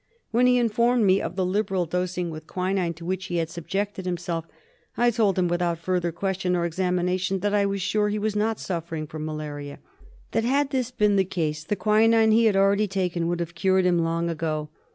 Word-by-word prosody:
When 245 +2 +4
he 250 0 +4
informed 235 0 +2
me 190 0 +4
of - - -4
the 185 -1 0
liberal 190 -1 0
dosing 180 0 -2
with 155 0 -9
quinine 185 -2 -1
to 165 +1 -10
which 185 +1 -2
he 175 - -3
had 165 -1 -1
subjected 190 +3 -3
himself 170 -2 -3 0.5
I 240 0 +4
told 210 -5 +1
him, 180 -1 +2
without 175 -1 0
further 175 0 -1
question 185 +1 -1
or 170 -1 0
examination, 180 +2 0
that 205 0 0
I 200 -1 +3
was 195 -1 -2
sure 210 +2 +1
he 210 - -1
was 210 0 -1
not 215 +1 0
suffering 165 -3 -4
from 155 0 -6
malaria; 150 -2 -6 0.5
that 225 - +1
had 275 +3 +1
this 255 -3 0
been 210 -5 +2
the 190 - +4
case 155 -5 -2
the 205 - -1
quinine 220 +2 +4
he 230 +1 +4
had 215 -3 +3
already 200 +2 +3
taken 180 -3 -1
would 175 0 -1
have 170 0 -4
cured 190 +1 +2
him 175 -1 +3
long 165 0 0
ago. 155 -2 -2
185 Hz, 210 wpm, -25 LUFS, 170-210 Hz, 0.5 s, When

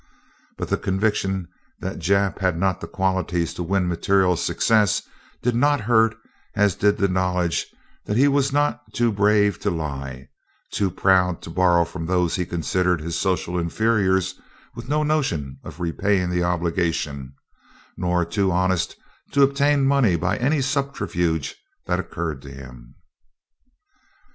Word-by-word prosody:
But - - -4
the - - 0
conviction 95 -2 -1 0.3
that 95 - -5
Jap 100 +3 +1
had 95 -4 +1
not 95 0 0
the - - -6
qualities 95 -3 -1
to - - -6
win 90 +1 0
material 90 +1 +2
success 105 +4 +2 0.4
did 125 - +2
not 145 +2 +3
hurt 115 0 +3 0.4
as 105 -3 +3
did 105 +3 +2
the 100 - +2
knowledge 90 -2 0 0.4
that 105 - -1
he 140 +3 +5
was 140 -1 +2
not 145 +1 +1
too 120 -1 +2
brave 105 -1 +2
to 105 - -1
lie, 70 -6 -5 0.4
too 100 -2 0
proud 90 -1 +2
to 80 - -8
borrow 85 -1 +3
from 85 0 -6
those 90 -2 +1
he 90 -2 -2
considered 90 +1 0
his 80 +2 -4
social 90 -1 -1
inferiors 95 +1 +1
and - - -28 0.3
with 115 +3 -9
no 150 +1 +1
notion 85 - -1
of - - -10
repaying 90 +2 0
the 90 0 0
obligation, 85 -5 -1 0.6
nor 90 -1 0
too 100 +2 0
honest 90 -1 0 0.4
to 140 - +5
obtain 140 0 +3
money 135 -9 +3
by 90 +4 0
any 140 +4 +1
subterfuge 90 - -1 0.3
that - - 0
occurred 80 -5 -4
to 70 - -11
him. 65 -2 -12
95 Hz, 150 wpm, -23 LUFS, 85-105 Hz, 0.6 s, he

